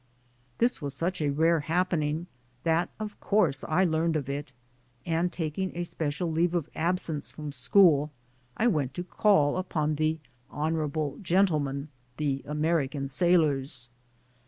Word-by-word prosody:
This 240 -4 +2
was 140 -1 -4
such 175 +3 -1
a 150 - +1
rare 160 +3 +3
happening 165 -1 0 0.4
that 165 +1 +2
of 210 -1 -6
course 175 -10 +2
I 175 +4 +2
learned 165 -1 +1
of 140 -3 -2
it, 140 -1 -4 0.5
and 170 +1 0
taking 170 +3 -3
a 175 - -1
special 165 0 -3
leave 170 +2 +1
of 160 -3 -2
absence 165 -3 -1
from 150 -2 -6
school, 150 +2 +4 0.5
I 225 - +1
went 150 - +1
to 175 - -3
call 180 -6 +3
upon 155 -5 -1
the 155 +1 +1 0.3
honorable 155 -1 -2
gentlemen, 155 -7 +1 0.3
the 140 -3 -1
American 150 -2 0
sailors. 140 -7 +1
160 Hz, 135 wpm, -28 LUFS, 145-175 Hz, 0.5 s, school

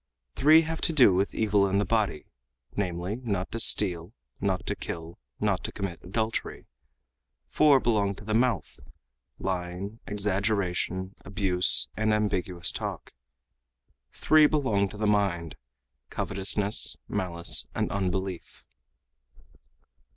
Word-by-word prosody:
Three 155 +4 +5
have 160 0 -5
to 165 - +1
do 125 -10 +6
with 95 +2 0
evil 100 -2 +2
in 95 +1 0
the 100 - +1
body, 110 -8 -1 0.5
namely, 90 +1 -3
not 100 -7 -3
to 115 - -4
steal, 90 -4 +2 0.3
not 95 -2 -1
to - - -2
kill, 85 +3 -7 0.2
not 100 -4 0
to - - -2
commit 95 -5 -5
adultery; 110 +5 -3 0.8
four 145 -3 +4
belong 105 -5 0
to 105 - -12
the 110 - -2
mouth, 115 -8 0 0.6
lying, 95 +3 -4
exaggeration, 100 -2 -1
abuse, 95 -2 +3
and 110 0 +1
ambiguous 90 -4 0
talk; - - -6 1.0
three 155 -1 +4
belong 110 -11 0
to 105 - -11
the 105 - -2
mind, 100 -6 0 0.5
covetousness, 100 +2 0
malice, 85 -2 0
and - - -1
unbelief." 95 -2 -4
100 Hz, 120 wpm, -27 LUFS, 90-110 Hz, 1.0 s, do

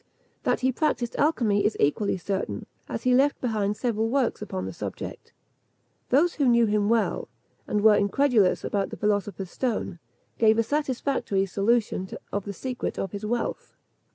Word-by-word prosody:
That - - 0
he 260 +1 +3
practised 255 -4 -1
alchymy 235 -10 +2
is 210 - +1
equally 190 +8 +1
certain, 190 +2 -3 0.2
as - - -4
he 255 -1 +3
left 275 +3 +3
behind 210 -4 -1
several 225 -2 0
works 265 -3 0
upon 95 - -4
the 95 - -5
subject. - - -7 0.8
Those 315 +7 +4
who 285 -4 +1
knew 235 -1 +5
him 210 -1 +1
well, 230 -1 +1 0.4
and 210 - 0
who - - -1
were 215 -1 +8
incredulous 210 -1 +2
about 200 -1 -1
the - - -7
philosopher's 205 -3 -1
stone, 220 -8 -2 0.4
give 220 -1 +5
a 230 - +3
satisfactory 260 -6 0
solution 200 0 0 0.2
of 205 -1 -2
the 200 - -4
secret 250 +4 -4
of 195 - -3
his 205 +1 -5
wealth. 235 +1 -3
220 Hz, 165 wpm, -26 LUFS, 200-250 Hz, 0.8 s, were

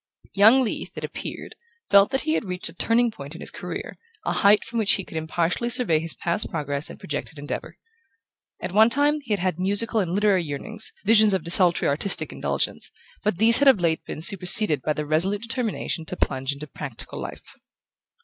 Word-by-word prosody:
Young 220 +7 +5
Leath, 225 - -5
it - - -6
appeared, - - -7 0.4
felt 200 0 +6
that 265 - -1
he 315 - -1
had 235 - -1
reached 180 -2 -2
a - - -13
turning 230 +6 +1
point 140 -5 -10
in - - -10
his - - -6
career, - - -7 0.3
a - - -1
height 205 +1 +4
from 235 - -4
which 210 -2 +2
he 195 - -2
could 170 - -13
impartially 165 +8 -2
survey 240 - +3
his 165 0 +2
past 175 +5 -3
progress 145 0 -2
and - - -10
projected 150 +1 -6
endeavour. 145 +1 -7 0.8
At 180 - -5
one 220 +4 +5
time 290 +4 +2
he 255 - -10
had 205 - +1
had 180 -2 -2
musical 205 +5 +2
and 180 -3 -2
literary 200 -3 +2
yearnings, 190 +9 -4
visions 215 -3 +5
of 185 - -3
desultory 175 +1 +1
artistic 155 +8 +2
indulgence; - - -3 0.3
but 210 -4 -1
these 225 +3 +4
had 285 - +3
of 265 -7 +6
late 165 -2 0
been 155 - -7
superseded 180 - +5
by 150 - -1
the 150 0 -4
resolute 185 +8 0
determination 230 -8 -3
to 180 - -7
plunge 130 +1 -2
into 140 +2 -6
practical - - -8
life. - - -9
195 Hz, 195 wpm, -23 LUFS, 160-225 Hz, 0.8 s, felt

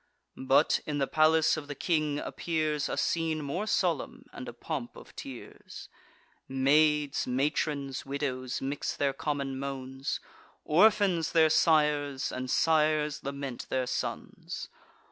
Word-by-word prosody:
But, 135 +4 +4
in 150 -1 -1
the 140 - +2
palace 155 +2 +3
of 150 -2 -6
the 145 - -5
king, 155 -2 0
appears 155 -2 -1
A - - -3
scene 160 -2 0
more 175 +10 -3
solemn, 175 -8 -1
and 125 - -7
a - - -8
pomp 120 0 -5
of - - -14
tears. 130 -3 -10 0.6
Maids, 145 +2 +2
matrons, 140 +1 -1
widows, 135 -3 -3
mix 140 +2 -2
their 140 -1 +1
common 140 -2 -3
moans; 135 0 -4 0.5
Orphans 180 -2 +4
their 160 -2 +5
sires, 150 -4 +2
and 130 0 -4
sires 155 -1 +2
lament 140 -2 -5
their 130 -1 0
sons. - - -5
145 Hz, 125 wpm, -29 LUFS, 135-155 Hz, 0.6 s, their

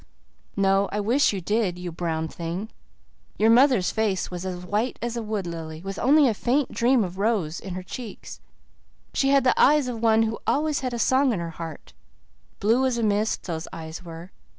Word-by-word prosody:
"No, 195 0 +2
I 210 - -2
wish 245 +8 +3
you 195 -2 -4
did, 205 -1 0
you 180 -1 -5
brown 160 -1 -2
thing. 170 +6 -5 0.7
Your 220 +2 +4
mother's 245 -5 +4
face 210 -5 -1
was 180 +1 -5
as 180 -1 -5
white 210 +7 -1
as 240 0 -3
a 235 - -2
wood 215 -3 -3
lily, 160 -2 -6
with 195 0 -5
only 290 +1 +5
a 230 - +2
faint 255 +6 0
dream 240 0 +3
of 185 0 -6
rose 200 -7 0
in 190 -2 -7
her 185 - -5
cheeks. 225 +3 -8 0.7
She 270 - +2
had 275 -1 +4
the 255 - +4
eyes 295 -2 +5
of 235 -3 -4
one 225 -1 +4
who 225 0 -2
always 300 0 +1
had 255 -2 -3
a - - -3
song 260 +2 +3
in 195 - -2
her 170 -1 -4
heart 165 -2 -9 0.7
blue 230 +6 +3
as 250 -2 -1
a 230 - -1
mist, 210 +1 0
those 165 -2 -5
eyes 160 +2 -8
were. 170 +1 -10
210 Hz, 200 wpm, -25 LUFS, 180-240 Hz, 0.7 s, only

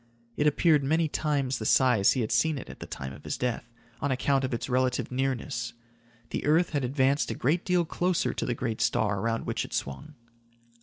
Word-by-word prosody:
It 150 - +2
appeared 150 0 +3
many 160 +4 +2
times 145 -3 -1
the 110 - -4
size 125 -7 +4
he 130 - -1
had 110 - -2
seen 150 +7 +2
it 130 - -8
at - - -13
the - - -7
time 65 0 -6
of 70 - -13
his - - -3
death, 120 -1 -3 0.3
on 140 - 0
account 135 +1 +1
of 130 - -1
its 120 - -3
relative 130 0 0
nearness. 130 -2 -2 0.6
The - - -2
earth 160 +4 +3
had 145 -3 -1
advanced 135 +2 +1
a - - -2
great 160 +8 +1
deal 180 -2 +2
closer 180 +2 0
to - - -3
the 120 - 0
great 115 -3 -3
star 105 -2 +1
around 115 +2 -1
which - - -1
it - - -6
swung. 145 - -5
130 Hz, 210 wpm, -28 LUFS, 120-150 Hz, 0.6 s, size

